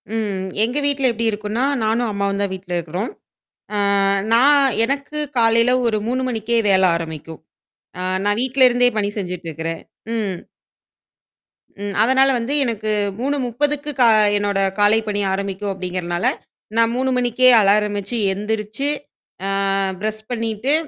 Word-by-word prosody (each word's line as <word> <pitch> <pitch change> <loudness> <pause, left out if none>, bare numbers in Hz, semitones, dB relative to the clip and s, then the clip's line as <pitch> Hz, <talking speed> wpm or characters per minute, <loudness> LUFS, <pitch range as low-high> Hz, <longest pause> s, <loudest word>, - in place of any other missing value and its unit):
ம். 200 -4 -2 0.2
எங்க 245 +5 -1
வீட்ல 275 -2 +2
எப்படி 230 0 0
இருக்கும்ன்னா 210 +4 -2 0.2
நானும், 225 +2 0
அம்மாவும் 200 0 -1
தான் 200 -1 -1
வீட்ல 185 -1 -9
இருக்கிறோம். 175 +6 -4 0.6
அ - - 0 0.6
நான் 280 +4 +5 0.2
எனக்கு 280 +3 -4 0.2
காலையில 230 +1 +4 0.2
ஒரு 220 -2 +1
3 255 +2 -1
மணிக்கே 235 0 -1
வேலை 190 -1 +4
ஆரம்பிக்கும். 160 -1 -7 0.6
அ - - -3 0.2
நான் 205 +1 +1
வீட்டிலருந்தே 250 -1 +4
பணி 205 -1 0
செஞ்சுட்டு 180 -3 -5
இருக்கிறேன். 160 +1 -5 0.3
ம். 200 -6 -3 1.4
ம் 205 0 -4
அதனால 265 +3 +4
வந்து 235 +5 -3
எனக்கு 220 -3 -2 0.3
3:30க்கு 285 +3 -1
கா 245 - +6 0.3
என்னோட 205 -1 -1 0.2
காலைப் 215 +2 +3
பணி 205 -1 -1
ஆரம்பிக்கும் 200 +1 -3
அப்படிங்கிறனால, 180 -1 -3 0.5
நான் 230 0 +3
3 260 +1 0
மணிக்கே 250 +1 +4
அலாரம் 205 +1 +2
வச்சு, 205 +5 -4 0.2
எந்திரிச்சு 215 +5 -3 0.6
அ - - -1 0.5
ப்ரஷ் 215 0 -3
பண்ணீட்டு, 230 +3 -1
220 Hz, 130 wpm, -20 LUFS, 200-245 Hz, 1.4 s, கா